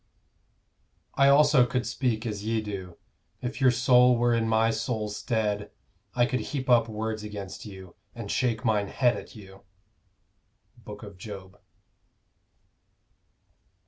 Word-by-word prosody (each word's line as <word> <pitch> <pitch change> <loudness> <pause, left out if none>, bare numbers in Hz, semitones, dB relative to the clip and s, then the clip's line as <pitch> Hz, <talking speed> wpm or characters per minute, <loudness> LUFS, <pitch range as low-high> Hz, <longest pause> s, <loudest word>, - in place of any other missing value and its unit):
I 140 0 +4
also 145 -2 +6
could 125 -1 -2
speak 120 -2 -1
as 105 -3 -4
ye 110 +1 0
do; 95 -5 -7 0.4
if 130 +3 -5
your 130 - +6
soul 125 0 +4
were 120 0 +2
in 115 -1 +1
my 110 0 +3
soul's 110 -2 -3
stead, 105 -3 -1 0.5
I 120 -1 +4
could 130 0 -1
heap 130 -3 -3
up 115 -2 +4
words 110 0 -3
against 105 -1 -7
you, 95 -3 -11 0.2
and 115 -4 -6
shake 120 -3 0
mine 105 -3 +1
head 125 +1 +2
at - - -10
you. 95 -2 -13 1.2
_Book 105 0 -10
of 100 -3 -11
Job. 95 -2 -10
110 Hz, 135 wpm, -27 LUFS, 105-125 Hz, 1.2 s, also